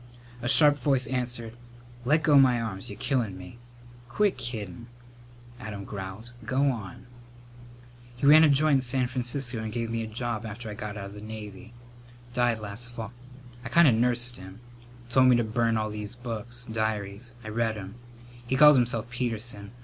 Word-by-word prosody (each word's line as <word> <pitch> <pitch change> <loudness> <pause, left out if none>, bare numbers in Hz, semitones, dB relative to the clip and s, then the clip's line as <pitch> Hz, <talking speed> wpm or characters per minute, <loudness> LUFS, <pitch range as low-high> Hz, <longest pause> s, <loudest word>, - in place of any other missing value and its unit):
A 120 - -1
sharp 145 0 +6
voice 130 -1 +1
answered, 120 -3 -3 0.5
"Let 155 +5 +3
go 145 -3 +6
my 125 -3 +5
arms. 105 -4 -5
You're 100 - -8
killin' 115 -9 -1
me!" 90 +5 -11 0.5
"Quit 205 +10 +2
kiddin'," 115 -4 -6 0.7
Adam 105 -3 -7
growled. 100 +4 -7
"Go 135 +2 +2
on!" 120 +1 -8 1.1
"He 125 - -3
ran 155 +3 +8
a 155 - +6
joint 145 +1 +4
in - - 0
San 130 0 +1
Francisco 125 0 -3
and 110 0 -4
gave 115 0 -3
me 115 0 -1
a 110 - -4
job 115 0 -3
after 110 0 -6
I - - -5
got 105 0 -6
out 100 0 -7
the 105 - -10
Navy. 110 +1 -9 0.6
Died 120 -2 +2
last 110 +4 -7
fall. 115 -1 -6 0.5
I 125 - -5
kind 170 -1 +6
of 125 - +6
nursed 120 +1 +1
him. 95 +3 -11 0.5
Told 130 +1 +5
me 125 - +6
to 120 - +2
burn 115 +1 +1
all 110 0 -2
these 105 +1 -6
books 120 0 -6
diaries. 110 +1 -3
I 110 - -6
read 110 0 -1
'em. 95 -1 -8 0.5
He 130 - 0
called 150 0 +8
himself 115 -2 0
Peterson. 115 -4 -3
120 Hz, 175 wpm, -27 LUFS, 110-125 Hz, 1.1 s, ran